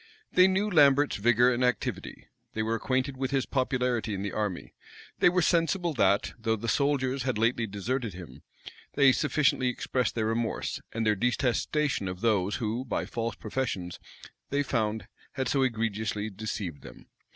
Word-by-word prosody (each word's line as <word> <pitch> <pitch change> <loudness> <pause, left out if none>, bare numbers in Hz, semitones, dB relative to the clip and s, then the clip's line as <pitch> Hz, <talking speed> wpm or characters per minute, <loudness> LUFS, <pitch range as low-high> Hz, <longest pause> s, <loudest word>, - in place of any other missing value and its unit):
They 185 +1 +6
knew 190 +2 +1
Lambert's 145 -6 +4
vigor 120 +4 +4
and 120 +1 -1
activity; 125 -1 -2 0.3
they 110 - -1
were 110 +1 -1
acquainted 130 +4 -1
with 135 0 -2
his 135 -1 0
popularity 125 -4 -1
in 95 - -4
the 100 - -3
army; 105 -4 -3 0.5
they - - +6
were 180 -1 +1
sensible 170 +1 +1
that, 100 -7 +2
though 110 0 0
the 110 +2 -6
soldiers 135 0 +1
had 130 -3 -1
lately 115 +1 +1
deserted 110 +1 -3
him, 90 -2 -11 0.5
they 140 -2 +6
sufficiently 145 -2 +1
expressed 125 0 -1
their 110 -2 0
remorse, 115 +1 -2
and 115 0 -2
their 105 - +4
detestation 125 +2 0
of 90 0 -6
those 105 -4 +1
who, 115 +2 -2
by 130 - -2
false 115 -2 -3
professions, 105 -8 -4 0.5
they 140 +1 +1
found 110 -4 -1 0.3
had 130 -2 -2
so 135 +1 +1
egregiously 110 -3 -1
deceived 100 -5 -5
them. - - -13
120 Hz, 160 wpm, -28 LUFS, 110-135 Hz, 0.5 s, They